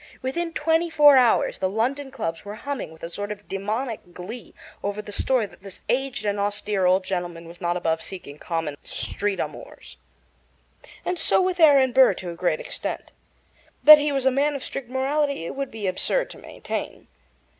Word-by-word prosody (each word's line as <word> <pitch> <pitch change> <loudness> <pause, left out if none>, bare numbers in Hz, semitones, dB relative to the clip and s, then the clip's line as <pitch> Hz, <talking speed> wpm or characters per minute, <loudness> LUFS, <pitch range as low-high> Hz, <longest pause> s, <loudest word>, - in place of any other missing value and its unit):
Within 330 +6 -2
twenty 325 +2 +1
four 295 -3 +7
hours 250 -3 +3
the 185 - 0
London 260 +7 -1
clubs 165 -11 -4
were 205 +1 -7
humming 280 - -5
with 160 - -16
a 165 - -4
sort 205 +3 -4
of 205 -1 -8
demoniac 215 +5 -3
glee 220 +8 -9 0.3
over 205 +1 -3
the 210 0 -7
story 245 +2 +1
that 200 - -15
this 195 -1 -11
aged 270 -1 0
and 205 0 0
austere 205 -1 0
old 185 +1 +3
gentleman 175 -3 -4
was 170 +2 -13
not 175 0 0
above 165 -2 0
seeking 150 -6 -7
common 165 -4 -3
street 205 -1 -2
amours. - - -7 1.1
And 360 -1 -1
so - - +4
with 370 -1 0
Aaron 280 -5 +6
Burr 260 +1 +6
to 180 -2 -6
a - - -8
great 175 -2 0
extent. - - -5 0.7
That 305 0 +11
he 295 0 0
was 270 -2 -1
a 265 - +5
man 285 +3 +1
of 275 - -5
strict 260 -3 -6
morality 275 - 0
it - - -5
would 275 -1 -3
be 220 -2 -6
absurd 190 - 0
to - - -11
maintain. - - -6
220 Hz, 190 wpm, -24 LUFS, 185-275 Hz, 1.1 s, That